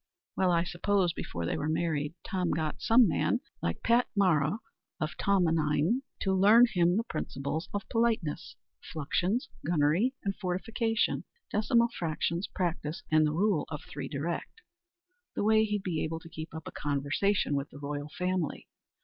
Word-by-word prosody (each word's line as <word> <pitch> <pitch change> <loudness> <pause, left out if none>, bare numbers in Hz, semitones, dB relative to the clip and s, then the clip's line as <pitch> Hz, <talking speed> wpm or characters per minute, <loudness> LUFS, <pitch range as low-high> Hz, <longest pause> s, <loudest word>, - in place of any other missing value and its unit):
Well, 185 -1 +2
I 170 -1 +3
suppose, 180 0 +1
before 85 - -4
they - - -1
were 150 - -2
married, 155 -1 -1
Tom 180 -2 -1
got 155 -2 -2
some 230 0 +6
man, 165 - +1 0.2
like 85 - -2
Pat 235 +2 +4
Mara 170 -3 +3 0.4
of 155 -1 -2
Tomenine, 165 - +2 0.2
to 190 - +1
learn 210 +6 +7
him 175 -4 +2
the 225 - +1
"principles 150 - -4
of 205 +1 -4
politeness," 225 -10 0 0.4
fluxions, 180 - 0 0.2
gunnery 170 - +2
and 195 -1 -1
fortification, 220 +4 -1 0.3
decimal 235 +3 +3
fractions, 170 -2 -2
practice, 170 -4 -3
and 155 0 +5
the - - 0
rule 185 +1 +1
of 150 -2 -6
three 140 -2 -6
direct, 170 - -4 0.7
the - - -1
way 220 +1 +5
he'd 210 -2 -2
be 170 -4 -1
able 160 +1 -3
to 165 - -12
keep 160 -1 -7
up 160 - -7
a - - -6
conversation 145 +6 0
with 140 0 -1
the - - -12
royal 145 +1 -4
family. 180 -1 -2
175 Hz, 160 wpm, -30 LUFS, 155-205 Hz, 0.7 s, learn